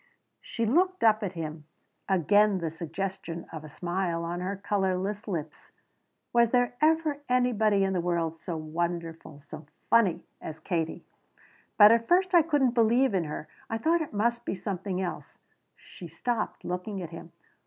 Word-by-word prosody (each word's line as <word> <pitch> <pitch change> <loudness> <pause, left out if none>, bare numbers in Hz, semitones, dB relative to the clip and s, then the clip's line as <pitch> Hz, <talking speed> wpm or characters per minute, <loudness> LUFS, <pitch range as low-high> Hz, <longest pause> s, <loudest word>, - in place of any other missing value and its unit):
She 230 - -3
looked 365 - +2
up 220 -1 +5
at 195 -3 -3
him, 155 -2 -6 0.4
again 205 +3 +4
the 165 -3 -3
suggestion 170 +1 -5
of 155 -1 -6
a 155 - -9
smile 175 +1 -2
on 170 +1 -3
her 185 +3 -3
colorless 195 +1 -1
lips. 160 -6 -5 0.6
"Was 235 -1 +5
there 245 0 +2
ever 310 -2 +2
anybody 220 -5 +3
in 190 0 0
the 180 - 0
world 170 -2 -1
so 170 -1 -4
wonderful 165 -1 -4
so 150 +1 -11 0.2
funny 210 -8 +4 0.2
as 160 0 -7
Katie? 165 -1 -3 0.7
"But 210 0 +9
at 230 0 +3
first 370 +1 +3
I 345 - +8
couldn't 290 -5 +2
believe 235 +1 +3
in 180 -4 +1
her. 150 0 -6 0.2
I 225 - -1
thought 330 +7 +2
it 310 - -4
must 235 +3 0
be - - -2
just 185 - -9
something 190 -2 -3
else." 185 -2 -5 0.4
She 175 - -12
stopped, 215 +8 -3
looking 180 +3 -4
at 165 - -8
him. 165 0 -10
195 Hz, 165 wpm, -28 LUFS, 170-230 Hz, 0.7 s, But